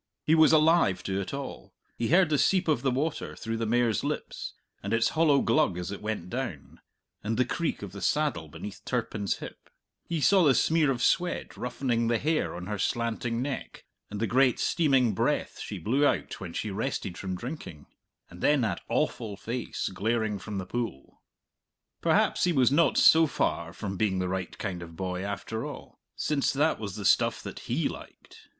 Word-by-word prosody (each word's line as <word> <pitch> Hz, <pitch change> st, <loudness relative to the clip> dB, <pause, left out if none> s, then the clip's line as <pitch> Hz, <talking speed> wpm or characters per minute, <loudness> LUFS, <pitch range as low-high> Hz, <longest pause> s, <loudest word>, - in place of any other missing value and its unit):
He 155 Hz, -, +4 dB
was 160 Hz, -1 st, +6 dB
alive 155 Hz, -, +4 dB
to 95 Hz, 0 st, -1 dB
it 95 Hz, -, -5 dB
all; 140 Hz, -1 st, -7 dB, 0.2 s
he 115 Hz, -, -1 dB
heard 175 Hz, +1 st, +4 dB
the 150 Hz, -2 st, +2 dB
seep 185 Hz, +6 st, +3 dB
of 155 Hz, -, +2 dB
the 135 Hz, -, +1 dB
water 145 Hz, +5 st, -2 dB
through 115 Hz, 0 st, -4 dB
the 115 Hz, 0 st, -2 dB
mare's 115 Hz, -2 st, +2 dB
lips, -, -, -4 dB, 0.3 s
and 100 Hz, +3 st, -3 dB
its 115 Hz, 0 st, +3 dB
hollow 155 Hz, -3 st, +3 dB
glug 150 Hz, -, +2 dB
as 90 Hz, +1 st, -4 dB
it 100 Hz, -, -6 dB
went 105 Hz, -5 st, -3 dB
down, 90 Hz, -, -5 dB, 0.4 s
and 110 Hz, +2 st, -1 dB
the 125 Hz, -, +3 dB
creak 160 Hz, -2 st, -2 dB
of 100 Hz, -, -6 dB
the 100 Hz, 0 st, -9 dB
saddle 125 Hz, -, 0 dB
beneath 80 Hz, +6 st, -8 dB
Turpin's 115 Hz, -5 st, -2 dB
hip; -, -, -10 dB, 0.4 s
he 170 Hz, -2 st, -1 dB
saw 190 Hz, +5 st, +5 dB
the 140 Hz, -5 st, +5 dB
smear 160 Hz, -3 st, +3 dB
of 125 Hz, -2 st, 0 dB
sweat 180 Hz, -1 st, +1 dB
roughening 120 Hz, -1 st, -1 dB
the 115 Hz, 0 st, +2 dB
hair 155 Hz, -, 0 dB
on 90 Hz, +1 st, -6 dB
her 105 Hz, +1 st, -4 dB
slanting 115 Hz, +2 st, -1 dB
neck, 140 Hz, -1 st, -5 dB, 0.2 s
and 105 Hz, -, -5 dB
the 115 Hz, -, +1 dB
great 125 Hz, +3 st, +3 dB
steaming 135 Hz, -9 st, +2 dB
breath -, -, -1 dB
she -, -, -5 dB
blew 130 Hz, +7 st, +1 dB
out 145 Hz, -, +1 dB
when 95 Hz, -3 st, -6 dB
she 105 Hz, +4 st, -3 dB
rested 100 Hz, -3 st, -3 dB
from 95 Hz, 0 st, -4 dB
drinking, 90 Hz, -, -7 dB, 0.4 s
and 90 Hz, 0 st, -13 dB
then 145 Hz, -2 st, +4 dB
that 105 Hz, -7 st, -1 dB
awful 105 Hz, -4 st, -1 dB
face 115 Hz, +4 st, -4 dB
glaring 110 Hz, +1 st, 0 dB
from 100 Hz, +2 st, -6 dB
the 95 Hz, -, -3 dB
pool. 115 Hz, -, -5 dB, 0.8 s
Perhaps -, -, +3 dB
he 180 Hz, -, +2 dB
was 130 Hz, -6 st, +3 dB
not 165 Hz, +3 st, +3 dB
so 160 Hz, 0 st, +7 dB
far 85 Hz, -, -1 dB
from 95 Hz, +2 st, -5 dB
being 100 Hz, -2 st, +1 dB
the 90 Hz, 0 st, -1 dB
right 95 Hz, -1 st, -4 dB
kind 90 Hz, -4 st, -4 dB
of 85 Hz, -1 st, -9 dB
boy, 90 Hz, 0 st, -3 dB
after 100 Hz, +2 st, -4 dB
all, -, -, -9 dB, 0.2 s
since 145 Hz, -3 st, 0 dB
that 150 Hz, +3 st, +1 dB
was 100 Hz, -3 st, -5 dB
the 105 Hz, -2 st, -5 dB
stuff -, -, +3 dB
that -, -, -7 dB
he -, -, +1 dB
liked. -, -, -11 dB
115 Hz, 195 wpm, -28 LUFS, 95-140 Hz, 0.8 s, so